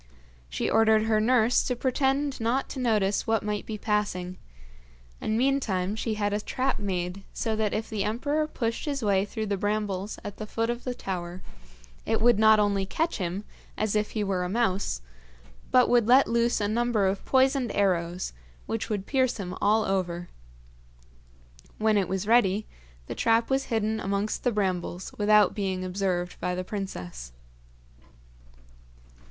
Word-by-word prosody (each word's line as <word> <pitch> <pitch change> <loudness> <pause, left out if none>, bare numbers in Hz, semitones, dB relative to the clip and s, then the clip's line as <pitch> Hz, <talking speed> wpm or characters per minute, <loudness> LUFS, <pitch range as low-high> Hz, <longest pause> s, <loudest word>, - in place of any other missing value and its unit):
She - - -2
ordered 220 -1 +4
her 220 -1 +2
nurse 240 +1 +4
to 250 - 0
pretend 270 +2 0
not 240 +4 0
to 270 - -6
notice 210 -5 +1
what 225 -1 +1
might 210 -1 -3
be 220 - -4
passing, 200 -4 -1 0.8
and 215 - 0
meantime 225 -8 +1
she 220 0 -2
had 205 -1 -1
a 210 - -1
trap 260 +5 -1
made 185 -1 -3
so 220 -1 -1
that 215 -1 0
if 220 - -2
the 215 -3 -2
emperor 285 +9 0
pushed 230 -4 -3
his 280 -4 -2
way 200 -2 +2
through 220 +1 -4
the 200 -1 -1
brambles 205 -1 -2
at 205 - -7
the 215 - -6
foot 230 +2 -1
of 240 0 -6
the 250 -1 -2
tower, 180 -3 -5 0.6
it - - 0
would 235 -1 +4
not 220 0 +6
only 200 -2 +2
catch 320 - -1
him, 185 +2 -3 0.3
as 215 -1 0
if 210 0 +1
he 210 - +1
were 190 -2 -1
a 180 - -3
mouse, 195 - 0 0.7
but 250 -1 +5
would 240 -3 +3
let 260 +3 +6
loose 235 0 +2
a 205 - 0
number 230 -1 +1
of 190 +1 -1
poisoned 265 -3 +2
arrows, 180 -2 0 0.3
which 225 +1 -3
would 205 -3 -2
pierce 260 -3 +1
him 180 -3 -5
all 215 +1 +3
over. 175 -2 -2 1.5
When 215 0 +2
it 195 -3 +2
was 190 +1 -2
ready, 215 -2 +3 0.4
the - - -5
trap 230 +2 +2
was 270 0 +1
hidden 220 -1 -1
amongst 200 +2 -2
the 245 - +2
brambles 185 -3 -2
without 210 -1 +5
being 190 -3 -2
observed 180 -1 -2
by 180 0 -1
the 185 - -3
princess. 90 - -6
210 Hz, 165 wpm, -27 LUFS, 190-235 Hz, 1.5 s, not